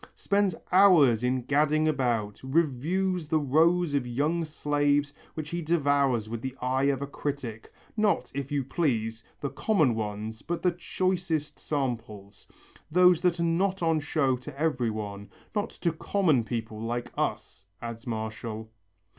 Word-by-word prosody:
"Spends 200 Hz, -3 st, +1 dB, 0.2 s
hours 165 Hz, -, +6 dB
in 125 Hz, 0 st, +1 dB
gadding 150 Hz, +3 st, +2 dB
about, 120 Hz, -8 st, 0 dB
reviews 165 Hz, +5 st, 0 dB
the 160 Hz, 0 st, +2 dB
rows 160 Hz, +3 st, +3 dB
of 135 Hz, -3 st, 0 dB
young 150 Hz, +8 st, 0 dB
slaves 145 Hz, -1 st, +1 dB, 0.2 s
which 155 Hz, -1 st, -5 dB
he 170 Hz, 0 st, -2 dB
devours 140 Hz, -8 st, +2 dB
with 115 Hz, 0 st, -5 dB
the 130 Hz, +1 st, -5 dB
eye 130 Hz, +2 st, +1 dB
of 140 Hz, -1 st, +1 dB
a -, -, -1 dB
critic, 135 Hz, -6 st, -5 dB, 0.2 s
not, 210 Hz, -2 st, +1 dB
if 140 Hz, 0 st, -4 dB
you 145 Hz, -2 st, 0 dB
please, 115 Hz, -7 st, -1 dB, 0.2 s
the 140 Hz, -, -2 dB
common 155 Hz, -, +2 dB
ones 110 Hz, 0 st, -4 dB
but 170 Hz, +1 st, -4 dB
the 180 Hz, -, +4 dB
choicest 175 Hz, -3 st, -2 dB
samples, 110 Hz, -, -4 dB, 0.4 s
those 180 Hz, +1 st, +5 dB
that 180 Hz, -2 st, +2 dB
are -, -, +1 dB
not 180 Hz, +3 st, +1 dB
on 165 Hz, -1 st, +3 dB
show 145 Hz, -3 st, +1 dB
to 135 Hz, +2 st, -10 dB
every 130 Hz, -7 st, +1 dB
one, 105 Hz, -2 st, -5 dB, 0.2 s
not 210 Hz, +1 st, -1 dB
to 170 Hz, -, -1 dB
common 160 Hz, -, +1 dB
people 110 Hz, -1 st, -4 dB
like 120 Hz, +1 st, -3 dB
us," 95 Hz, -, -3 dB
adds 115 Hz, +1 st, -7 dB
Martial. 110 Hz, 0 st, -5 dB
140 Hz, 150 wpm, -28 LUFS, 120-165 Hz, 0.4 s, hours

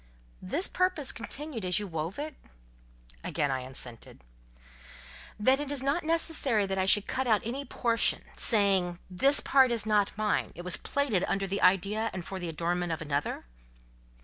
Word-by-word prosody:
"This 290 Hz, -, 0 dB
purpose 365 Hz, -6 st, +1 dB
continued 270 Hz, 0 st, -5 dB
as 180 Hz, -1 st, +1 dB
you 210 Hz, -, -2 dB
wove 165 Hz, 0 st, -5 dB
it?" 300 Hz, +1 st, -5 dB, 0.9 s
Again 145 Hz, -, -1 dB
I 130 Hz, -, -1 dB
assented. 125 Hz, -, -4 dB, 1.2 s
"Then 260 Hz, +6 st, +3 dB
it 290 Hz, -1 st, -4 dB
is 280 Hz, -2 st, -3 dB
not 280 Hz, +6 st, 0 dB
necessary 310 Hz, -9 st, +3 dB
that 195 Hz, 0 st, -3 dB
I 190 Hz, -, 0 dB
should 205 Hz, +1 st, +5 dB
cut 265 Hz, 0 st, -2 dB
out 215 Hz, -3 st, +2 dB
any 265 Hz, +5 st, -4 dB
portion—saying, 200 Hz, -6 st, +1 dB
this 270 Hz, +11 st, +4 dB
part 265 Hz, -2 st, +4 dB
is 230 Hz, -3 st, -1 dB
not 210 Hz, -1 st, +1 dB
mine: 215 Hz, -1 st, -1 dB
it 175 Hz, -, -8 dB
was 180 Hz, -1 st, +3 dB
plaited 260 Hz, -10 st, -1 dB
under 195 Hz, 0 st, -1 dB
the 195 Hz, +1 st, -3 dB
idea 200 Hz, +4 st, +2 dB
and 180 Hz, -2 st, -6 dB
for 190 Hz, +3 st, -6 dB
the 175 Hz, -2 st, -4 dB
adornment 170 Hz, +2 st, -2 dB
of 165 Hz, +1 st, -3 dB
another?" 145 Hz, -, -3 dB
205 Hz, 165 wpm, -29 LUFS, 180-265 Hz, 1.2 s, should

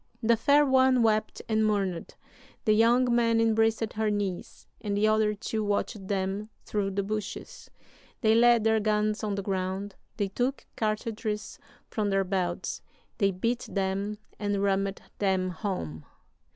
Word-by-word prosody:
"The 230 Hz, +1 st, +5 dB
fair 285 Hz, +6 st, +4 dB
one 260 Hz, -2 st, +4 dB
wept 215 Hz, -1 st, +1 dB
and 220 Hz, -1 st, +2 dB
mourned; 195 Hz, -5 st, -1 dB, 0.5 s
the 215 Hz, -, +5 dB
young 235 Hz, +3 st, +4 dB
man 230 Hz, -1 st, +3 dB
embraced 225 Hz, 0 st, +2 dB
her 220 Hz, 0 st, 0 dB
knees; 200 Hz, -4 st, -3 dB, 0.2 s
and 205 Hz, -1 st, -1 dB
the 215 Hz, +1 st, +3 dB
other 215 Hz, -1 st, +2 dB
two 220 Hz, +1 st, -3 dB
watched 205 Hz, -1 st, -2 dB
them 195 Hz, +2 st, -2 dB, 0.2 s
through 205 Hz, -2 st, -1 dB
the 200 Hz, +1 st, -1 dB
bushes. 210 Hz, 0 st, -5 dB, 0.5 s
They 220 Hz, -2 st, +4 dB
laid 235 Hz, 0 st, +5 dB
their 220 Hz, 0 st, +3 dB
guns 215 Hz, +1 st, 0 dB
on 205 Hz, -2 st, -1 dB
the 200 Hz, -, -3 dB
ground; 190 Hz, +1 st, -2 dB, 0.2 s
they 200 Hz, -3 st, 0 dB
took 250 Hz, +7 st, -2 dB
cartridges 215 Hz, 0 st, -3 dB, 0.3 s
from 210 Hz, -2 st, 0 dB
their 195 Hz, 0 st, +2 dB
belts; 180 Hz, -2 st, -2 dB, 0.4 s
they 200 Hz, -3 st, +4 dB
bit 230 Hz, +6 st, -2 dB
them 195 Hz, +2 st, -1 dB, 0.2 s
and 205 Hz, -1 st, 0 dB
rammed 195 Hz, 0 st, 0 dB, 0.2 s
them 190 Hz, -2 st, +1 dB
home. 160 Hz, -, -4 dB
210 Hz, 150 wpm, -28 LUFS, 195-225 Hz, 0.5 s, The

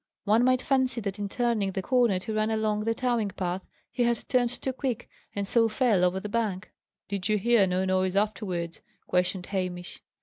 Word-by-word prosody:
One 220 Hz, +3 st, +4 dB
might 255 Hz, 0 st, +3 dB
fancy 260 Hz, -3 st, +1 dB
that 200 Hz, -1 st, -4 dB
in 205 Hz, -1 st, -2 dB
turning 225 Hz, -5 st, 0 dB
the 190 Hz, -, -2 dB
corner 240 Hz, -5 st, +3 dB
to 205 Hz, +4 st, -5 dB
run 215 Hz, 0 st, +1 dB
along 215 Hz, -1 st, 0 dB
the 225 Hz, 0 st, +1 dB
towing 240 Hz, -5 st, 0 dB
path 185 Hz, -1 st, -3 dB, 0.3 s
he 250 Hz, -, -2 dB
had 235 Hz, -1 st, +1 dB
turned 250 Hz, -2 st, +2 dB
too 260 Hz, +2 st, -3 dB
quick, 250 Hz, -3 st, -3 dB, 0.3 s
and 200 Hz, -1 st, -2 dB
so 230 Hz, +1 st, +3 dB
fell 215 Hz, -4 st, +2 dB
over 180 Hz, +1 st, +2 dB
the 210 Hz, -, -5 dB
bank." 210 Hz, -3 st, -2 dB, 0.4 s
"Did 200 Hz, 0 st, -3 dB
you 215 Hz, -, +3 dB
hear 220 Hz, -1 st, +4 dB
no 185 Hz, +1 st, 0 dB
noise 185 Hz, 0 st, +1 dB
afterwards?" 190 Hz, -5 st, -1 dB, 0.2 s
questioned 180 Hz, 0 st, 0 dB
Hamish. 180 Hz, -2 st, -4 dB
210 Hz, 195 wpm, -27 LUFS, 190-235 Hz, 0.4 s, One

